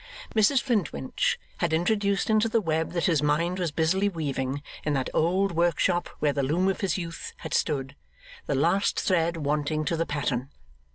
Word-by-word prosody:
Mrs 225 +5 +4
Flintwinch 180 - 0 0.2
had - - 0
introduced 200 +5 +1
into 215 +1 +3
the 230 - +2
web 160 -4 -1
that 170 - 0
his 165 -5 +3
mind 165 +5 +1
was 175 -4 -1
busily 185 +6 +1
weaving, 140 -5 -3 0.2
in 150 - 0
that 135 -2 -1
old 185 +5 +2
workshop 175 +1 +1
where 145 -1 +1
the 140 - 0
loom 160 +8 +1
of 195 - -2
his 195 -3 0
youth 170 -2 -6
had - - -4
stood, 140 -3 0 0.5
the 145 - 0
last 170 +8 +2
thread 170 -2 +1
wanting 150 +1 -1
to 165 - 0
the 165 0 -1
pattern. 135 -3 -2
165 Hz, 175 wpm, -27 LUFS, 145-190 Hz, 0.5 s, Mrs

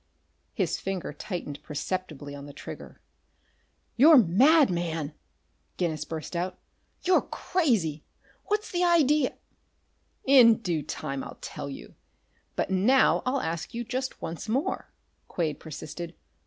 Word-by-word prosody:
His - - 0
finger 190 -5 -4
tightened 150 -3 -6
perceptibly 150 -2 -4
on 140 0 -8
the 145 - -10
trigger. - - -9 1.0
"You're 300 +5 +8
mad, 255 - +5
man!" 165 -4 -2 0.6
Guinness 160 -4 -1
burst 160 +2 -6
out. 180 +2 -2 0.5
"You're 365 0 +4
crazy! 210 - 0 0.4
What's 420 +1 -1
the 355 0 +1
idea 305 -5 +3 0.5
" - - -44 0.2
"In 230 -2 +8
due 175 -8 -1
time 140 -2 -4
I'll - - -9
tell 140 - -6
you. 135 - -9 0.6
But - - -1
now 215 +8 +4
I'll 265 +1 +1
ask 165 +7 -4
you 240 - -2
just 255 +2 -4
once 165 +6 -5
more," 275 - -1 0.4
Quade 160 -4 -2
persisted. 160 +2 -7
185 Hz, 130 wpm, -27 LUFS, 155-260 Hz, 1.0 s, You're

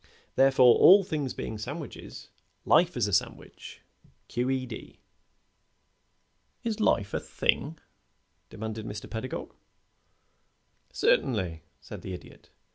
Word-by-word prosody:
Therefore, 135 -2 +6
all 195 +2 +8
things 150 -7 -3
being 110 - -5
sandwiches, 145 +6 -8 0.4
life 175 -3 +4
is 115 -4 +1
a 100 - -4
sandwich, - - -3 0.5
Q. 125 +2 -1
E. 130 -1 -1
D." 120 -3 -10 1.6
"Is 225 -2 -2
life 100 - +1
a - - 0
thing?" - - -1 0.7
demanded 110 0 -6
Mr. 105 0 -7
Pedagog. 115 +3 -6 1.4
"Certainly," 95 -10 +1 0.2
said - - -10
the 95 - -6
Idiot. - - -15
125 Hz, 110 wpm, -28 LUFS, 105-145 Hz, 1.6 s, all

